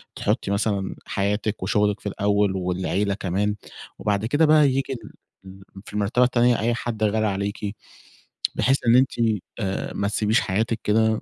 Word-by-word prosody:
تحُطّي - - -1
مثلًا 100 -1 -1
حياتِك 105 +1 -1
وشُغلِك 105 +2 +1
في 105 - -4
الأول 100 0 +1
والعيلة 95 +2 -1
كمان 100 +1 -1 0.4
وبعد 105 0 0
كده 145 +7 +3
بقى 150 -1 +6
ييجي 135 0 -1
ال 115 -4 -10 0.3
ال 95 +1 -12 0.2
في - - -12
المرتبة 105 +4 +2
التانية 120 -1 +3
أي 120 +2 +1
حد 115 -2 -4
غالي 110 +1 +2
عليكِ، 100 +1 -3 0.8
بحيث 135 +1 +3
إن 115 - +6
أنتِ 130 +1 +4 0.5
آآ، 95 -3 -3
ما 100 - -1
تسبيش 105 +2 +2
حياتِك 110 +4 -1
كده 110 +1 +2
105 Hz, 155 wpm, -23 LUFS, 100-115 Hz, 0.8 s, بقى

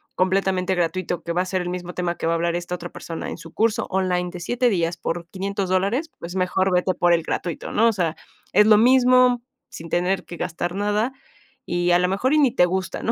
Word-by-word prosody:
completamente 190 0 +1
gratuito, 175 0 -2
que 170 - -3
va 175 - +1
a - - -2
ser 185 0 -1
el 175 - -4
mismo 180 0 -5
tema 175 -1 -2
que - - -2
va 165 - +2
a - - +1
hablar 170 +1 0
esta 175 +1 -3
otra 175 0 -7
persona 165 -1 -6
en - - -6
su 165 - -12
curso 225 +1 +1
online 180 -2 0
de 180 - -8
7, 245 +7 +1
días, 170 -4 0
por 170 0 -4
500 195 +1 -3
dólares, 200 - 0
pues 170 +2 -7
mejor 185 +1 +1
vete 180 +1 +2
por 175 0 +2
el 165 -1 +2
gratuito, 170 0 -4
¿no? 225 +2 +3
O 230 - +3
sea, 170 -5 -1 0.4
es 210 +3 +6
lo 215 -1 +7
mismo 250 +1 +5 0.3
sin 165 +1 -9
tener 180 +3 0
que 175 - -9
gastar 175 +1 -3
nada 210 +4 0 0.5
y 175 0 0
a 175 - +5
lo 180 - +2
mejor 225 +9 +1
y 305 - +4
ni 275 -4 +4
te 180 - +4
gusta, 185 +1 -3
¿no? 230 - +1
185 Hz, 240 wpm, -23 LUFS, 175-205 Hz, 0.5 s, lo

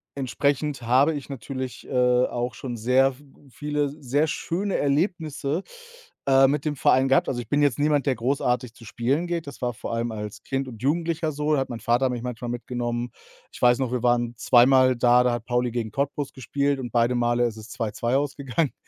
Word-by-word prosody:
entsprechend 140 +1 -1
habe 130 +7 +4
ich 145 -1 -7
natürlich, 130 -1 -6
äh, 125 -1 +3
auch 120 +1 -3
schon 125 -3 -5
sehr 130 +4 +3
v 135 +3 -19 0.3
viele, 150 +2 -1
s 140 - -5
sehr 140 +3 +1
schöne 185 +6 -2
Erlebnisse, 155 +1 -1 0.6
äh, 135 0 +6
mit 145 +2 -1
dem 150 -1 -1
Verein 130 +1 +3
gehabt. 135 - +3
Also, 125 - -2
ich 115 - -12
bin 145 +3 +2
jetzt 140 -5 +2
niemand, 145 -1 +2
der 135 - +2
großartig 125 -1 -1
zu 120 - -16
spielen 135 +10 -1
geht. 170 -2 -2
Das 140 - -9
war 125 -1 -1
vor 115 - -6
allem 115 0 -1
als 105 -1 -6
Kind 135 0 -2
und 115 -4 -10
Jugendlicher 160 +2 0
so. 150 +1 0
Da 145 - +3
hat 135 - -2
mein 120 -2 -5
Vater 125 +3 +2
mich 120 -1 -4
manchmal 125 -1 -5
mitgenommen. 120 0 -3 0.4
Ich - - -13
weiß 120 0 +5
noch, 130 -3 -1
wir 125 - -1
waren 120 -1 +2
zweimal 130 +1 +5
da, 120 +1 +5
da 125 -1 +2
hat 120 -1 -4
Pauli 125 0 0
gegen 115 -2 -3
Cottbus 140 +3 -2
gespielt 140 +2 -1
und 120 -3 -5
beide 120 +1 +2
Male 120 0 +2
ist 110 -2 -7
es 110 +1 -11
2:2 120 +2 -1
ausgegangen. 140 0 -1
130 Hz, 205 wpm, -25 LUFS, 120-145 Hz, 0.6 s, äh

